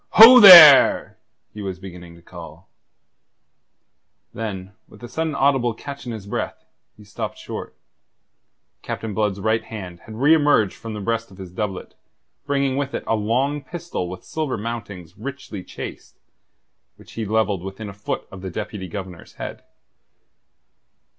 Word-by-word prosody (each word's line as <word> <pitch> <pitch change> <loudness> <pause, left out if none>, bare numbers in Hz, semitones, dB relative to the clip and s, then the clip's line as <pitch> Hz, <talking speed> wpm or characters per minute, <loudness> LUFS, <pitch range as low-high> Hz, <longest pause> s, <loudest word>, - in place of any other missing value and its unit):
"Ho 240 +4 +10
there..." 170 - +9 0.3
he 105 - -8
was 95 -2 -5
beginning 90 -2 -12
to 85 - -19
call. 85 0 -13 1.7
Then 100 -4 -6 0.2
with - - -18
a - - -7
sudden 160 +4 -3
audible 135 -4 +1
catch 140 +1 -9
in - - -4
his 110 -3 -8
breath, 100 - -5 0.3
he 105 - -15
stopped 100 -1 -7
short. - - -8 1.1
Captain 110 -2 -6
Blood's 105 -1 -1
right 110 +2 0
hand 95 -6 -9
had 110 - -9
reemerged 145 - +3
from 115 -1 -9
the 105 - -6
breast 115 +2 -3
of 95 - -17
his 95 -2 -10
doublet, 95 -1 -5 0.5
bringing 140 -1 0
with 140 -1 -3
it - - -4
a 115 - 0
long 130 +7 -1
pistol 170 - -6
with 90 0 -9
silver 155 -6 -4
mountings 105 -5 -8
richly 135 -6 -8
chased, - - -10 0.8
which - - -18
he 115 - -5
levelled 105 -3 -1
within 95 +3 -8
a 100 - -8
foot 100 +1 -5
of 95 - -10
the 95 - -6
Deputy 95 +2 -6
Governor's 90 -1 -9
head. - - -8
110 Hz, 150 wpm, -21 LUFS, 95-135 Hz, 1.7 s, Ho